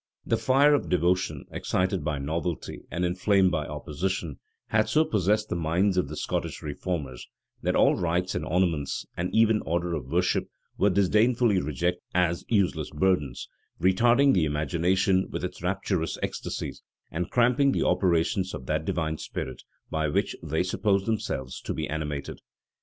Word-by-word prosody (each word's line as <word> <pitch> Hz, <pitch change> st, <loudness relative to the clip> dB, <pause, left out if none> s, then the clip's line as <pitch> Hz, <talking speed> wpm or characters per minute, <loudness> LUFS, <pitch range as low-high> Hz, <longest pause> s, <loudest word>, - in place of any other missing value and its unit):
The -, -, +2 dB
fire 140 Hz, +3 st, +4 dB
of 145 Hz, -, 0 dB
devotion, 90 Hz, +1 st, +1 dB
excited 95 Hz, 0 st, -1 dB
by 75 Hz, -1 st, -1 dB
novelty, 80 Hz, +4 st, -3 dB
and 90 Hz, +1 st, -1 dB
inflamed 95 Hz, +1 st, +3 dB
by 75 Hz, -3 st, -1 dB
opposition, 75 Hz, +1 st, -3 dB, 0.3 s
had 110 Hz, 0 st, +2 dB
so 155 Hz, +1 st, +4 dB
possessed 105 Hz, -, +1 dB
the -, -, -1 dB
minds 85 Hz, +4 st, +1 dB
of 90 Hz, -6 st, +1 dB
the 75 Hz, -, -6 dB
Scottish -, -, -3 dB
reformers, 75 Hz, -4 st, -4 dB, 0.3 s
that -, -, 0 dB
all -, -, +5 dB
rites 90 Hz, +1 st, 0 dB
and -, -, -2 dB
ornaments, 85 Hz, -5 st, 0 dB
and 90 Hz, +1 st, -2 dB
even 110 Hz, -1 st, +4 dB
order 85 Hz, +1 st, -1 dB
of 70 Hz, -6 st, -4 dB
worship, 90 Hz, +5 st, +1 dB, 0.3 s
were 100 Hz, -, +3 dB
disdainfully 105 Hz, +2 st, +3 dB
rejected 85 Hz, +5 st, -1 dB
as 85 Hz, -1 st, +2 dB
useless 90 Hz, -8 st, +1 dB
burdens; 75 Hz, -5 st, 0 dB, 0.3 s
retarding 120 Hz, +9 st, +4 dB
the 90 Hz, -4 st, +3 dB
imagination 85 Hz, +6 st, +1 dB
in -, -, -3 dB
its 90 Hz, -, -7 dB
rapturous 95 Hz, -2 st, -1 dB
ecstasies, -, -, -4 dB, 0.3 s
and 85 Hz, +1 st, -3 dB
cramping 125 Hz, +3 st, +3 dB
the -, -, 0 dB
operations 90 Hz, +1 st, +1 dB
of 65 Hz, -, -8 dB
that 80 Hz, +2 st, -1 dB
divine 80 Hz, -2 st, -1 dB
spirit 65 Hz, -, -5 dB, 0.3 s
by 80 Hz, -1 st, 0 dB
which -, -, 0 dB
they 80 Hz, +1 st, 0 dB
supposed 100 Hz, +1 st, +1 dB
themselves 65 Hz, -, -3 dB
to -, -, -4 dB
be -, -, -2 dB
animated. 75 Hz, -2 st, -4 dB
90 Hz, 155 wpm, -27 LUFS, 80-100 Hz, 0.3 s, all